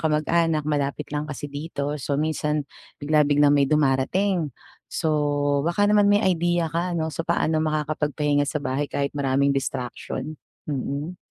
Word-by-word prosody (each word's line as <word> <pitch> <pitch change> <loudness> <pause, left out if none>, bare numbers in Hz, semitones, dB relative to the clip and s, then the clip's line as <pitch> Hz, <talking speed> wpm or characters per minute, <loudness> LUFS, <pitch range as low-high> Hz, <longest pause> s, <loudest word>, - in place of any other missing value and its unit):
kamag-anak 155 0 +1
malapit 145 0 -1
lang 150 +1 -2
kasi 145 0 -5
dito. 145 0 -4
So 140 0 -1
minsan 150 -1 -1 0.3
bigla-biglang 145 -1 +3
may 140 -1 +3
dumarating. 155 +5 +1 0.4
So 160 - -1 0.6
baka 205 +5 +2
naman 210 -1 +5
may 205 - +4
idea 175 -3 +1
ka, 170 +3 -2
no. 160 -1 -1
So 165 +2 -4
paano 160 -2 +1
makakapagpahinga 150 -1 0
sa 150 +1 -2
bahay 140 +1 -1
kahit 140 +1 -2
maraming 140 0 +2
distraction. 135 +4 -4 0.3
Mm. 145 +4 -3
150 Hz, 140 wpm, -24 LUFS, 145-165 Hz, 0.6 s, naman